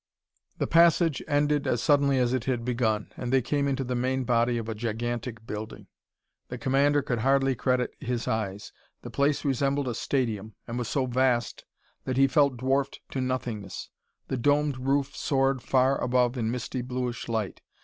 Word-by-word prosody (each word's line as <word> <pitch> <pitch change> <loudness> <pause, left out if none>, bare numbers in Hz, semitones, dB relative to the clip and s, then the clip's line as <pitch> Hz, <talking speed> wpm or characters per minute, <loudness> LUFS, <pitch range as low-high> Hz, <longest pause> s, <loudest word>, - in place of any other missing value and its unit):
The - - 0
passage 165 -2 +4
ended 145 -1 +1
as 120 - +1
suddenly 140 +1 +3
as 125 -1 +2
it 130 -2 -1
had 125 -3 -1
begun, 115 -4 0
and 125 -1 -4
they 130 -2 +3
came 140 +3 0
into 135 -1 -1
the 125 0 -3
main 130 +2 0
body 120 0 +2
of 115 -1 -4
a 115 - -2
gigantic 115 +1 -4
building. 110 0 -6 0.6
The 125 - -6
commander 140 +3 +2
could 120 -2 -1
hardly 135 +2 +3
credit 125 0 0
his 125 -3 -3
eyes. 105 -2 -3 0.3
The - - -7
place 140 +1 +1
resembled 140 0 +1
a 120 - -1
stadium, 110 -5 -2
and 120 +1 -3
was 120 - -3
so 135 +2 0
vast 125 -1 0 0.4
that 130 -1 -2
he 135 - +6
felt 140 -1 +3
dwarfed 135 +2 0
to 130 - -2
nothingness. 120 -6 -4 0.4
The 130 - -2
domed 145 +1 +2
roof 135 +1 0
soared 135 -2 +1
far 130 +2 +2
above 125 0 +2
in 115 -3 -1
misty 125 +1 -3
bluish 125 -1 -4
light. 110 -4 -2
130 Hz, 175 wpm, -27 LUFS, 120-135 Hz, 0.6 s, he